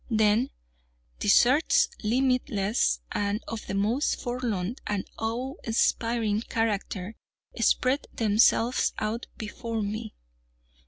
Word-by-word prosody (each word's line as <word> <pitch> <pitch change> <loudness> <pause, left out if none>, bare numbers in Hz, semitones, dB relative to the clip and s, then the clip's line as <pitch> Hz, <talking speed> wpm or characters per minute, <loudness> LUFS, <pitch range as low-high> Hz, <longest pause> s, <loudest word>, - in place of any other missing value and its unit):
Then 220 +2 +3 0.7
deserts, 255 +9 +4
limitless, 225 - +1
and 205 +1 -1
of 225 -2 -6
the - - -3
most 220 +9 +1
forlorn 240 -4 -2
and 205 -2 -1
awe 235 +4 -2
inspiring 225 -1 +1
character, 215 -3 -2 0.4
spread 255 +4 +2
themselves 225 +2 +3
out 220 +2 -3
before 225 0 -4
me. 215 +2 -5
225 Hz, 95 wpm, -27 LUFS, 210-240 Hz, 0.7 s, deserts